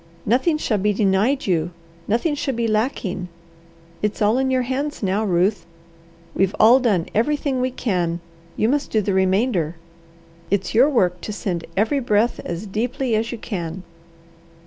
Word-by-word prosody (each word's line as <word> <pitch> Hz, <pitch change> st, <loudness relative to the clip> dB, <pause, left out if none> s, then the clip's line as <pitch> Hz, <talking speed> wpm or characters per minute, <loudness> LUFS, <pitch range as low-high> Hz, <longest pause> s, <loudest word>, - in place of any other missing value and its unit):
Nothing 260 Hz, -, +2 dB
shall 220 Hz, -8 st, 0 dB
be 210 Hz, +2 st, +1 dB
denied 210 Hz, +7 st, +1 dB
you! 170 Hz, -3 st, +1 dB, 0.4 s
Nothing 235 Hz, +9 st, +1 dB
shall 275 Hz, -3 st, -2 dB
be 235 Hz, 0 st, 0 dB
lacking! 215 Hz, -5 st, -1 dB, 0.7 s
It's 210 Hz, 0 st, -1 dB
all 215 Hz, +4 st, +3 dB
in 265 Hz, 0 st, +1 dB
your 260 Hz, -1 st, +1 dB
hands 270 Hz, +2 st, -3 dB
now, 195 Hz, +3 st, +1 dB
Ruth. 190 Hz, +1 st, +1 dB, 0.7 s
We've 195 Hz, 0 st, +1 dB
all 235 Hz, +4 st, +7 dB
done 205 Hz, -10 st, +1 dB
everything 270 Hz, +2 st, 0 dB
we 255 Hz, -, +1 dB
can; 180 Hz, -9 st, -1 dB, 0.4 s
you 215 Hz, -, +2 dB
must 280 Hz, +3 st, 0 dB
do 215 Hz, -, +2 dB
the 200 Hz, -1 st, -1 dB
remainder. 190 Hz, -3 st, +1 dB, 0.7 s
It's 195 Hz, -1 st, 0 dB
your 250 Hz, +6 st, +5 dB
work 180 Hz, -, +1 dB
to -, -, -5 dB
send 180 Hz, -5 st, -3 dB
every 225 Hz, +8 st, +2 dB
breath 230 Hz, -1 st, +1 dB
as 175 Hz, +4 st, -5 dB
deeply 235 Hz, +4 st, -1 dB
as 225 Hz, +2 st, -1 dB
you 240 Hz, -, -4 dB
can. 185 Hz, -5 st, -5 dB
215 Hz, 160 wpm, -21 LUFS, 190-255 Hz, 0.7 s, all